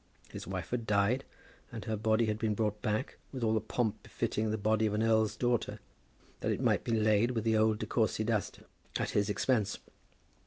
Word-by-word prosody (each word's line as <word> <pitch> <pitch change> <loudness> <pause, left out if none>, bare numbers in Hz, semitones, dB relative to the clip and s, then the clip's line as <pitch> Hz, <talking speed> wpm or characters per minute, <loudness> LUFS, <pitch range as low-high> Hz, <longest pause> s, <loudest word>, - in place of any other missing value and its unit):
His - - -7
wife - - -4
had 120 -2 -2
died 105 +6 +2 0.5
and - - -6
her 110 - -1
body 110 +2 +2
had 110 -1 -1
been 110 -2 0
brought 105 -1 -1
back, 110 +2 -1
with 130 -3 -5
all 110 -1 +3
the 110 - +2
pomp 115 -4 -1
befitting 110 0 -2
the 110 - 0
body 110 +1 +2
of 105 - -1
an 110 - +1
earl's 110 -1 +3
daughter, 120 -1 0 0.6
that - - -1
it - - -1
might - - +2
be - - -3
laid 110 0 +3
with 115 -3 -1
the 110 -1 +2
old 110 0 +3
De - - -3
Courcy 110 -2 +1
dust, 110 -2 -1 0.3
at - - -1
his 100 0 +1
expense. 105 -1 +1
110 Hz, 205 wpm, -32 LUFS, 105-115 Hz, 0.6 s, all